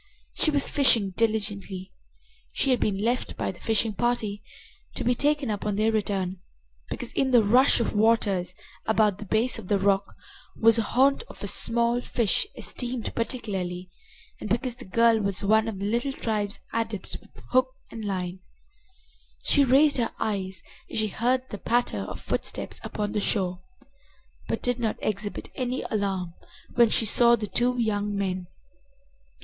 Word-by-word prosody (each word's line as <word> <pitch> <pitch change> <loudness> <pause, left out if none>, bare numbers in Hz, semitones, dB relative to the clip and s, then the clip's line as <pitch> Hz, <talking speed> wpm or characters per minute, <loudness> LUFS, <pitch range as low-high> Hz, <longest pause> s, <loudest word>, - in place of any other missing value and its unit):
She - - +3
was 285 -2 +1
fishing 240 -9 +3
diligently. 200 -3 -2 0.6
She 270 - +1
had 250 - +2
been 200 -1 -1
left 240 +3 -1
by - - -2
the 175 - -16
fishing 225 0 0
party, 215 -1 -1 0.5
to - - -3
be 245 - +2
taken 285 -1 +1
up 205 - -4
on 210 -1 -1
their 215 +2 +2
return, 195 -4 -2 0.5
because, 245 - -5
in 270 - +1
the 240 -3 +5
rush 245 +7 +5
of 235 - -1
waters 205 -4 +1 0.3
about 215 -3 +2
the 210 - -7
base 225 +4 +1
of 200 - -10
the 200 - +2
rock, 195 0 +1 0.4
was 225 0 +5
a - - +3
haunt 270 +5 +2
of - - -12
a - - -2
small 235 +1 +3
fish 235 - +1
esteemed 245 -2 -3
particularly, 190 -7 -4 0.5
and 210 - -6
because 240 +1 -1
the 255 - -11
girl 230 +3 +3
was 200 -2 0
one 220 +2 +3
of 220 -3 -4
the 195 - -4
little 240 +6 -1
tribe's 210 -5 -2
adepts 225 -3 -3
with - - -21 0.2
hook 255 0 +4 0.2
and 225 - -7
line 185 -2 -3 1.0
She 285 - +4
raised 275 +3 +4
her 235 -2 -1
eyes 190 -4 -3 0.3
as - - -5
she 215 -1 +1
heard 250 +5 0
the 205 - -6
patter 240 - 0
of - - -7
footsteps - - -4
upon 210 -1 -3
the 210 - -1
shore, 185 -3 +2 0.9
but - - -3
did 245 0 0
not 225 -3 -1
exhibit 205 0 -4
any 255 0 -3
alarm 195 -5 -2 0.4
when 235 -2 +5
she 225 - +3
saw 235 +3 +5
the 215 -2 -4
two 245 +4 +2
young 205 -3 -1
men. 185 -2 -2
220 Hz, 165 wpm, -26 LUFS, 200-240 Hz, 1.0 s, the